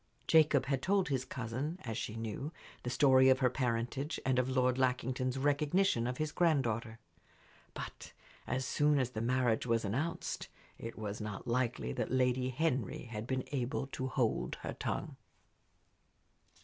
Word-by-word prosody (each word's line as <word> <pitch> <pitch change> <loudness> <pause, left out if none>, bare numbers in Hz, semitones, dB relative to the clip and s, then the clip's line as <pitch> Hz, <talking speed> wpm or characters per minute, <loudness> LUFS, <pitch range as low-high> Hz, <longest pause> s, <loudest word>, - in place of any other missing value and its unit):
Jacob 155 -4 +5
had 135 -1 0
told 195 -2 +2
his 130 -3 0
cousin, 130 +6 -4
as 115 -3 -4
she 105 - -3
knew, 115 +6 -4 0.3
the 125 - -3
story 130 +1 +6
of 130 - +6
her 130 -2 +2
parentage 125 +4 -1
and 130 -1 +3
of 130 0 +1
Lord 130 0 +2
Lackington's 130 0 0
recognition 145 -1 +2
of 125 0 -3
his 155 -1 -1
granddaughter. 120 -10 +1 0.8
But - - -7 0.4
as 130 0 -1
soon 150 +2 +3
as 130 -2 +1
the 110 - -3
marriage 125 -1 +1
was 115 -1 +2
announced 140 +12 -2 0.3
it 115 - -7
was 105 -1 -4
not 105 +2 -5
likely 120 - 0
that - - -2
Lady 125 0 +2
Henry 130 - -1
had 115 -1 -6
been 130 0 -1
able 135 0 -1
to 130 - -2
hold 125 -4 0
her - - -3
tongue. - - -3
130 Hz, 155 wpm, -34 LUFS, 115-140 Hz, 0.8 s, story